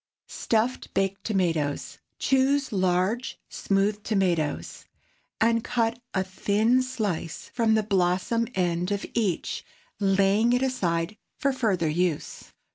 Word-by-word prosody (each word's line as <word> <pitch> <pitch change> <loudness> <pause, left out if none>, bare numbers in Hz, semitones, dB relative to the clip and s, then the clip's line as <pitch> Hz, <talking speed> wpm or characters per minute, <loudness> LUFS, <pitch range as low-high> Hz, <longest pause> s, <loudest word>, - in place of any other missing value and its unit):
STUFFED 230 +3 -1
BAKED 195 0 0
TOMATOES. 165 -8 0
✠ - - -11 0.2
Choose 270 0 +2
large, 190 +5 0
smooth 200 +1 0
tomatoes, 180 -8 -1 0.5
and 230 0 +3
cut 235 -1 0 0.2
a 190 - +2
thin 210 +6 +2
slice 210 -10 -3
from 225 -2 +3
the 220 - +2
blossom 195 +3 +1
end 175 -1 0
of 200 0 -1
each, 205 -8 -1 0.4
laying 200 +3 +3
it 250 +1 +2
aside 180 -7 -1 0.2
for 275 0 +1
further 210 -10 +1
use. 165 0 -1
200 Hz, 120 wpm, -26 LUFS, 180-230 Hz, 0.5 s, and